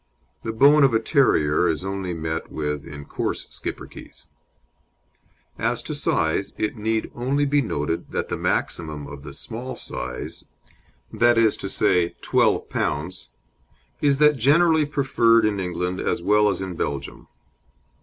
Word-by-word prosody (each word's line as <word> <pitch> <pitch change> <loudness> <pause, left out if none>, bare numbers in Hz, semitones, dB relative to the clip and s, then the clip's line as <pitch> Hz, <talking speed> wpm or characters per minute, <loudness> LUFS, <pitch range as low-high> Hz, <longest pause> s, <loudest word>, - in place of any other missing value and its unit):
The 115 - -3
bone 140 +6 +6
of 130 -4 +4
a - - +4
terrier 90 - +2
is 80 +3 -1
only 95 -1 -3
met 80 -1 -4
with 75 -2 -3
in 70 -1 -9
coarse - - -3
Schipperkes. - - -8 1.3
As - - -1
to - - -5
size, 80 +5 0
it 105 - -1
need 110 0 -2
only 135 +4 0
be 145 +1 +2
noted 80 - -3
that - - -2
the - - -3
maximum 75 -3 -2
of 70 0 -9
the 70 0 -9
small 120 - -6
size, 60 - -6 0.7
viz., 115 -2 +3
12 90 -2 +1
lbs., 85 +5 -2 0.7
is 140 -2 +3
that 150 0 +5
generally 155 +4 +4
preferred 115 -6 +3
in 105 -2 0
England, 90 0 -2
as - - -1
well 105 +2 +4
as 95 - -2
in 95 -2 -5
Belgium. 70 -3 -4
105 Hz, 135 wpm, -23 LUFS, 80-125 Hz, 1.3 s, bone